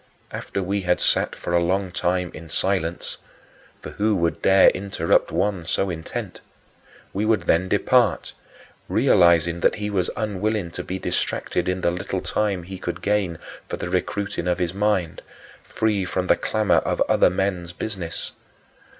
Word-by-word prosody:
After 100 - -4
we 100 +2 -1
had 90 -1 +1
sat - - +1
for 85 - -4
a 85 - +4
long 95 +1 0
time 90 0 -1
in 80 0 -10
silence 90 -1 -1 0.7
for - - -7
who 105 +1 +1
would 85 -2 0
dare 95 0 +6
interrupt 95 -4 0
one 100 -4 0
so 95 +3 0
intent? 80 -1 -6 0.7
we 100 - -1
would 110 0 +2
then 90 +3 +2
depart, 120 +4 +2 0.6
realizing 85 -1 +4
that - - +3
he 105 0 -3
was 95 -3 0
unwilling 105 -3 -1
to - - -5
be 95 - -4
distracted 90 -1 -1
in 90 0 -1
the 85 - +2
little 90 - -3
time 100 -4 -1
he 95 +2 -8
could 85 - -5
gain 100 -5 0 0.3
for - - -4
the 90 - -5
recruiting 95 0 -2
of 90 - +1
his 90 -2 -1
mind, 100 -5 0 0.4
free 105 -3 0
from 90 0 -2
the - - +4
clamor 110 -2 +1
of - - -2
other - - +4
men's 90 -2 -2
business. 90 -2 -5
95 Hz, 160 wpm, -23 LUFS, 85-100 Hz, 0.7 s, dare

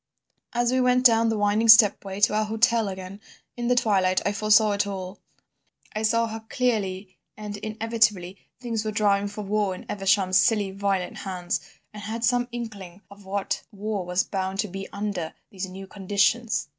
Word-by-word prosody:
"As 240 0 +1
we 255 0 +2
went 250 0 +2
down 230 -1 +5
the 220 - 0
winding 205 +2 +1
stepway 205 -3 +6
to 210 - +4
our 215 0 +1
hotel 225 0 +2
again, 190 +1 -7 0.3
in 240 -1 -3
the 250 - +3
twilight, 195 -6 +2
I 200 - +2
foresaw 215 +1 +4
it 205 0 0
all: 190 -1 -6 0.8
I 215 - -1
saw 230 +1 +2
how 225 0 -5
clearly 200 -6 -2 0.2
and 210 -1 -6
inevitably 215 -4 0 0.2
things 230 -3 -3
were 215 - -2
driving 205 -1 +1
for 205 +1 -7
war 205 -1 0
in - - -11
Evesham's 195 -2 +2
silly, 210 -4 +2
violent 195 -2 -2
hands, 180 -2 -3 0.3
and 210 - -9
I - - -8
had 225 +1 -4
some 245 0 +2
inkling 205 -6 -8
of 200 0 -15
what 195 +1 -2
war 205 -1 -3
was 180 +1 0
bound 190 -1 -3
to 210 - -4
be 195 +1 -7
under 200 -5 -4 0.2
these 190 -1 -5
new 190 +1 -9
conditions. 205 +3 0
205 Hz, 180 wpm, -25 LUFS, 195-225 Hz, 0.8 s, stepway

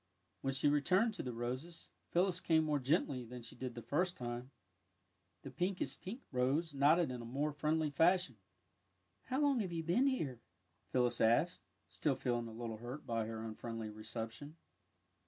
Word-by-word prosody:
" 90 - -44
When 135 0 -1
she 135 - +3
returned 185 +10 +3
to 200 - -4
the 125 - -3
roses, 130 +8 -5 0.2
Phyllis 180 0 +2
came 160 -3 +3
more 150 -2 +1
genth" 130 -3 +1
than 125 -1 -7
she 115 - -8
did 125 -2 -5
the 120 - -6
first 180 +4 0
time. 120 +1 -4 0.9
The 135 - -7
pinkest 180 +6 -1
pink 225 +8 -6
rose 140 +5 +1
nodded 150 +3 +4
in 125 -1 -4
a - - -7
more 140 +6 -1
friendly 155 +1 +1
fashion. 175 0 +4
'^ - - -34 0.9
How 260 - -1
long 285 -4 +4
have 190 -5 -1
you 165 -1 -2
been 205 - +3
here? 150 - -1 0.3
" 85 0 -42
Phyllis 125 -1 +2
asked, 120 +10 +3 0.3
still 145 -4 0
feeling 120 -3 -1
a - - -7
little 115 -1 -5
hurt 120 +6 -7
by 115 -2 -1
her 110 0 -4
un 110 - -4
friendly 115 -1 -5
reception. 115 +7 -6
135 Hz, 185 wpm, -36 LUFS, 120-170 Hz, 0.9 s, nodded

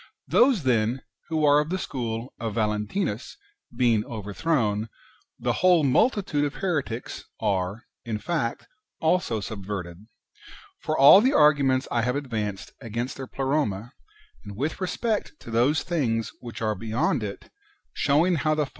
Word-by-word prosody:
Those, 245 - +4
then, 120 0 +1 0.2
who 160 -2 +1
are 145 0 +6
of 150 +1 -1
the 185 - -1
school 120 -7 -4
of 115 -2 -4
Valentinus 105 - -2 0.4
being 115 -3 +3
overthrown, 110 0 -1 0.5
the - - -1
whole 180 -3 +5
multitude 155 - +2
of 145 -1 -2
heretics 145 -11 -3
are, 100 +1 -1 0.2
in 110 -2 -3
fact, 130 -2 -2 0.3
also 160 -9 +1
subverted. 100 -2 -6 0.7
For 155 0 -2
all 145 +9 +9
the 260 +4 +3
arguments 140 -3 +4
I 120 - +1
have 125 +3 0
advanced 110 -8 -4
against 115 +3 -4
their 135 -1 -7
Pleroma, 135 -5 -1 0.5
and 100 -2 -9
wdth 145 +6 -2
respect 205 +4 -2
to 115 - -9
those 125 +7 +2
things 120 -10 -1
which 120 -1 -7
are 110 -1 +1
beyond 110 +4 -1
it, 100 -2 -7 0.4
showing 160 +5 +2
how 155 +1 +1
the. 150 -1 +1
125 Hz, 140 wpm, -25 LUFS, 110-155 Hz, 0.7 s, all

